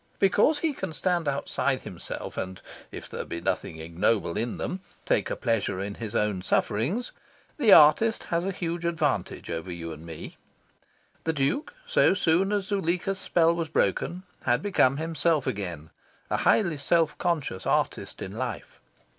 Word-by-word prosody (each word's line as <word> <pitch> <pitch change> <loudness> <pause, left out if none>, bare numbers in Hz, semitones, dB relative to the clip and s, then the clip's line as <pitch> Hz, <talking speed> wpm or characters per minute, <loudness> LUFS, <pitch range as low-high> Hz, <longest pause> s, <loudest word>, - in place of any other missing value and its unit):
Because 205 +10 +4
he 315 -1 0
can 165 - -5
stand 175 -1 0
outside 140 0 0
himself, - - -7
and 95 0 -4 0.3
(if - - -8
there - - -5
be 85 - -5
nothing 80 -1 -2
ignoble 85 +3 0
in 115 +1 -2
them) 185 - -3 0.3
take - - +1
a - - -1
pleasure 105 -5 0
in 100 +1 -3
his 110 0 -6
own 105 -3 +1
sufferings, 135 - 0 0.5
the 240 -9 +4
artist 205 +9 +7
has 170 0 -1
a 190 - -1
huge 170 -2 -3
advantage 155 - -1
over 85 +2 -4
you 85 -1 -5
and 80 +1 -11
me. 80 -2 -9 0.9
The 160 - +1
Duke, 155 - -1
so 485 - +4
soon 185 +3 +2
as 205 -2 0
Zuleika's 190 -1 -1
spell 170 -2 +3
was 165 -2 -3
broken, 175 +3 0 0.2
had 120 +3 +2
become 140 -9 +3
himself 160 -2 +1
again 90 -6 -4 0.4
a - - +2
highly 175 -8 +3
self 160 +2 +2
conscious 155 - -1
artist - - -1
in - - -6
life. - - -5
160 Hz, 160 wpm, -27 LUFS, -, 0.9 s, artist